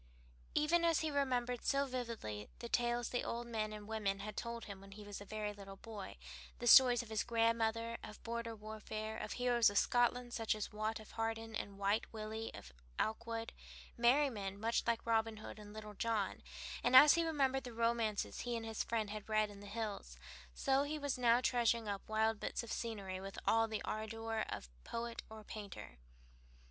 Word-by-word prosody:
Even 335 +3 +4
as 335 -2 +4
he 315 -1 0
remembered 250 -4 0
so 280 0 +2
vividly 230 - -4
the 235 - -6
tales 240 0 +1
the 245 - -1
old 235 +1 -3
men 220 -2 -2
and 210 -1 -7
women 205 -3 -1
had 210 0 -5
told 235 0 -4
him 200 -2 -8
when 195 0 -11
he 210 +1 -10
was 205 -1 -7
a - - -8
very 210 0 -3
little 195 -1 -10
boy, 210 -1 -8 0.4
the 240 - -5
stories 245 0 +8
of 230 - -13
his 220 -1 0
grandmother, 230 0 +1
of 210 - -10
border 230 0 -3
warfare, 215 0 -5
of - - -4
heroes 245 -3 +4
of 205 - -2
Scotland, 245 +1 +3
such 225 -2 +1
as 215 - -4
Watt 215 +1 -1
of 215 - -12
Harden, 225 0 -2
and 200 -1 -4
Wight 200 +2 +1
Willie 220 0 -4
of - - -11 0.3
Aikwood, 230 +1 -1 0.4
merrymen 235 -6 +2
much 230 +2 +2
like 235 -1 +1
Robin 225 -1 +2
Hood 215 - -8
and 205 -1 -10
Little 215 0 -8
John, 215 -2 -1 0.4
and 255 - +4
as 290 +3 +11
he 335 - +3
remembered 275 -5 +1
the 245 - -6
romances 230 -2 0
he 245 -1 -2
and 225 - -5
his 225 -1 -2
friend 220 -3 -1
had 215 0 -6
read 215 -1 +2
in 200 - -11
the 205 - -10
hills, 205 - -4 0.4
so 270 - +3
he 295 +2 -1
was 285 -3 -2
now 240 0 +5
treasuring 235 -3 +2
up 200 0 -4
wild 220 0 +2
bits - - -2
of 235 - -7
scenery 195 -5 -4
with 195 0 -7
all 225 0 +4
the 220 -1 -3
ardor 225 +1 -3
of - - -4
a - - -27
poet 235 0 -4
or 220 0 -9
a - - -18
painter. 200 - -8
225 Hz, 200 wpm, -37 LUFS, 210-240 Hz, 0.4 s, as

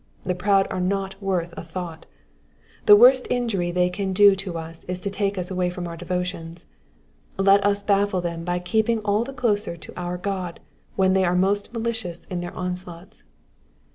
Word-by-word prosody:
The 180 - -1
proud 195 +2 +2
are 185 - -2
not 195 +1 -2
worth 180 -3 -1
a - - -6
thought. 175 -3 -7 0.8
The 205 - +11
worst 250 +4 +6
injury 225 -8 0
they 180 +1 +1
can 195 0 -2
do 200 0 +7 0.2
us 165 0 -8
is 180 0 -4
to 200 - -3
take 200 0 -1
us 180 0 -4
away 180 -1 0
from 175 0 -5
our 170 - -6
devotions; 175 -1 -4 0.7
let 195 +1 +5
us 205 0 +1
baffle 200 -1 +2
them 170 -1 -4
by 175 +1 -1
keeping 220 +6 +1
all 210 +1 +1
the 270 - -7
closer 215 -9 -1
to 160 - -11
our 180 0 -4
Goa 185 -2 -3 0.4
when 190 -1 +3
they 190 0 +3
are 180 0 +2
most 200 +3 +1
malicious 225 -7 -4
in 180 - -2
their 175 0 -6
onslaughts. 180 +1 -6
185 Hz, 180 wpm, -23 LUFS, 180-205 Hz, 0.8 s, The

